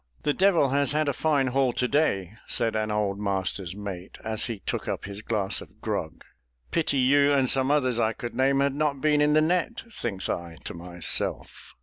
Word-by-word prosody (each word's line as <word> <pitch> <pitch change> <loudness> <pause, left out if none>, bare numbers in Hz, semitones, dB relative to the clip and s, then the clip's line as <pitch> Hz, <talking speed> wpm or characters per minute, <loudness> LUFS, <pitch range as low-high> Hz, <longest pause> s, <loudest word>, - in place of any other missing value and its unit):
"The 145 - +2
devil 180 -7 +3
has 140 +1 +1
had 155 0 +1
a 140 - +1
fine 145 -1 +1
haul 130 -1 +1
to 125 - 0
day!" 110 - +1
said 115 -1 +1
an 110 0 0
old 105 -2 -1
master's 95 -2 -2
mate, 100 -3 -7
as 110 0 0
he 115 -3 -4
took 95 - -4
up - - -3
his 100 +1 -6
glass 105 -4 0
of - - -14
grog. - - -4 0.5
"Pity 160 -4 +1
you, 140 +2 +4
and 135 -2 +3
some 130 +1 +3
others 130 -5 +2
I 110 -1 +2
could 120 +1 -6
name, 135 +1 +2
had 140 -1 +2
not 145 -1 0
been 150 0 +3
in 150 0 +4
the 155 - +5
net!" 180 +8 0
thinks 95 - -1
I 85 -1 -4
to - - -6
myself. 85 0 -4
130 Hz, 205 wpm, -26 LUFS, 100-145 Hz, 0.5 s, the